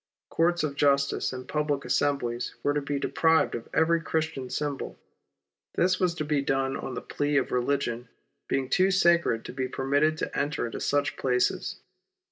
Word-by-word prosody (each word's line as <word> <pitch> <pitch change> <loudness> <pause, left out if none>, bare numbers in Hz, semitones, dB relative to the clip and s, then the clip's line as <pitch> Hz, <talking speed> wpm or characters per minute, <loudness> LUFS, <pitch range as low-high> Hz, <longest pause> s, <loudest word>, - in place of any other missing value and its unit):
Courts 170 0 +2
of 145 -2 -2
justice, 140 -1 +2
and 130 0 -7
public 150 -2 -1
assemblies 125 -4 0
were 145 - +2
to 145 - 0
be 140 0 -2
deprived 160 +2 +2
of 115 - -6
every 165 +1 +3
Christian 160 -5 -2
symbol. 145 -1 -3 0.8
This 185 +1 +2
was 180 -2 +1
to 155 - -3
be 145 -1 +1
done 135 0 0
on 130 - -5
the - - -5
plea 145 0 0
of 135 - 0
religion 125 -2 -1 0.4
being 135 -1 0
too 185 +8 +3
sacred 170 -11 +3
to - - -7
be 130 0 -2
permitted 145 +4 +1
to - - -4
enter 150 -1 -1
into 115 - -5
such 145 0 0
places. 125 -1 0
145 Hz, 170 wpm, -27 LUFS, 135-160 Hz, 0.8 s, every